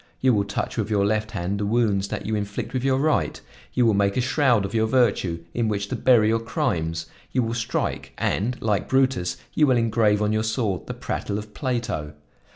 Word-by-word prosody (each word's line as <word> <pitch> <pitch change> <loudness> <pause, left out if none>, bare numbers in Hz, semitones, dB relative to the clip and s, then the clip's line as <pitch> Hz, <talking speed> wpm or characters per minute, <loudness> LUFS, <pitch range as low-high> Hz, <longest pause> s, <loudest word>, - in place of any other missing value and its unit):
You 130 -1 +3
will 100 -2 +1
touch 100 +4 -3
with 110 -2 -1
your 100 -2 +2
left 110 +1 0
hand 95 0 -3
the 105 - -1
wounds 105 -4 +1
that - - -5
you 110 - -2
inflict 105 +1 -3
with 130 -1 -1
your 135 -1 +2
right; 155 +3 +1 0.3
you 125 - +3
will 110 - +4
make 100 +1 +1
a - - +3
shroud 125 -5 +2
of 100 - -6
your 110 -1 +2
virtue 100 -9 +1
in 120 -2 0
which 100 -1 -2
to - - -2
bury 115 -4 +4
your 115 +1 +2
crimes; 85 -7 -2 0.3
you 125 - +1
will 115 0 -2
strike, 120 +1 -2
and, 120 +6 -1
like 105 -2 0
Brutus, 130 -9 +1 0.2
you 150 - +4
will 130 -2 +4
engrave 110 -2 +2
on 105 0 +1
your 110 - +1
sword 110 -5 -1
the - - -5
prattle 100 - -3
of 105 0 -8
Plato! 115 - -2
110 Hz, 215 wpm, -24 LUFS, 100-120 Hz, 0.3 s, will